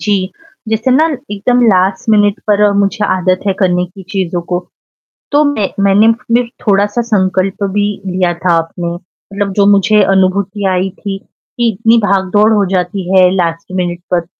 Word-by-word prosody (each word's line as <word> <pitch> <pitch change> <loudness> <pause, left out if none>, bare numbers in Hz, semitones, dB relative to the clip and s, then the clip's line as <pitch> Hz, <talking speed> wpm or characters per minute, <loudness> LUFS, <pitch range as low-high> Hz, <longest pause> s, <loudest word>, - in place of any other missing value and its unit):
जी, 200 -2 -1 0.4
जैसे 225 +3 0
ना 305 +5 +4 0.2
एकदम 245 +5 0
लास्ट 190 +2 +1
मिनट 205 0 +3
पर 210 0 +3
मुझे 200 +1 0
आदत 185 0 0
है 195 - +2
करने 180 -2 +1
की 190 +2 -13
चीज़ों 180 -3 -2
को। 175 0 -2 0.7
तो 290 +1 +4
मैं 220 -9 0 0.2
मैंने 205 +3 +4
फ़िर 240 0 0
थोड़ा-सा 205 +3 +1
संकल्प 195 -3 -1
भी 205 0 +1 0.2
लिया 180 -1 0
था 170 -2 +3
अपने 170 +1 -4
मतलब 195 +3 -7
जो 200 -1 +3
मुझे 205 +1 +4
अनुभूति 195 +1 0
आई 185 +1 0
थी, 195 -1 -5 0.4
कि 235 -1 +2
इतनी 225 +4 +2
भाग-दौड़ 205 +1 +2
हो 205 -2 +2
जाती 185 +1 -1
है 185 -1 +5
लास्ट 165 -2 -2
मिनट 175 -1 -2
तक, 170 -1 -1
195 Hz, 165 wpm, -13 LUFS, 185-210 Hz, 0.7 s, है